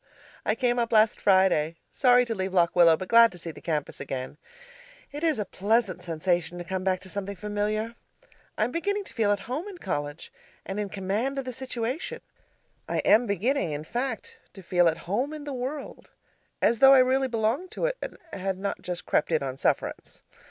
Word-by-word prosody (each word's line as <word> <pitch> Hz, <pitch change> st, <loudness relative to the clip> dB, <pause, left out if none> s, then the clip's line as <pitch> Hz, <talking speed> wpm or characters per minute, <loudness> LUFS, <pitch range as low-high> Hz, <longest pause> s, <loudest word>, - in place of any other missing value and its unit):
I -, -, +3 dB
came 245 Hz, -1 st, +1 dB
up 235 Hz, -1 st, 0 dB
last 220 Hz, -1 st, +4 dB
Friday, 185 Hz, -5 st, +3 dB, 0.2 s
sorry 250 Hz, -2 st, +4 dB
to 230 Hz, -, -2 dB
leave 190 Hz, -2 st, -3 dB
Lock 170 Hz, -1 st, +3 dB
Willow, 170 Hz, -2 st, +6 dB
but 185 Hz, -, -6 dB
glad 230 Hz, +1 st, +7 dB
to -, -, -11 dB
see 170 Hz, -1 st, -5 dB
the -, -, -13 dB
campus 155 Hz, -4 st, -3 dB
again. 130 Hz, +2 st, -5 dB, 0.7 s
It 295 Hz, +3 st, -6 dB
is 320 Hz, -2 st, +2 dB
a 210 Hz, -, -2 dB
pleasant 200 Hz, -1 st, 0 dB
sensation 175 Hz, +1 st, -1 dB
to 175 Hz, -, -5 dB
come 185 Hz, +1 st, -3 dB
back 185 Hz, -1 st, 0 dB
to 190 Hz, -, -11 dB
something 200 Hz, +1 st, -4 dB
familiar. 210 Hz, +3 st, -2 dB, 0.6 s
I -, -, +2 dB
am 235 Hz, -, -1 dB
beginning 405 Hz, +6 st, -1 dB
to -, -, -14 dB
feel 220 Hz, -4 st, +2 dB
at 205 Hz, -, 0 dB
home 290 Hz, -, -4 dB
in 395 Hz, -3 st, -8 dB
college, 145 Hz, -, -4 dB, 0.3 s
and 195 Hz, +2 st, -4 dB
in 205 Hz, -1 st, -2 dB
command 205 Hz, +8 st, -2 dB
of 270 Hz, -, -2 dB
the 255 Hz, -, -5 dB
situation; 260 Hz, -, -4 dB, 0.7 s
I -, -, -1 dB
am 230 Hz, +3 st, +5 dB
beginning, 200 Hz, -, 0 dB
in 145 Hz, +1 st, -4 dB
fact, 270 Hz, -, -4 dB, 0.2 s
to 195 Hz, -, -10 dB
feel 175 Hz, 0 st, +3 dB
at 160 Hz, -, +1 dB
home 245 Hz, -, -1 dB
in 300 Hz, -, -8 dB
the 290 Hz, -1 st, -5 dB
world 265 Hz, +3 st, -6 dB, 0.5 s
as 235 Hz, -, +3 dB
though 270 Hz, 0 st, +9 dB
I -, -, +7 dB
really 260 Hz, +1 st, +3 dB
belonged 230 Hz, +9 st, -1 dB
to -, -, -1 dB
it -, -, -1 dB
and -, -, -6 dB, 0.2 s
had 190 Hz, 0 st, -2 dB
not 200 Hz, +1 st, -3 dB
just 180 Hz, -1 st, -5 dB
crept -, -, +1 dB
in 160 Hz, -3 st, +2 dB
on 130 Hz, -1 st, -3 dB
sufferance. -, -, -2 dB
210 Hz, 205 wpm, -27 LUFS, 180-255 Hz, 0.7 s, though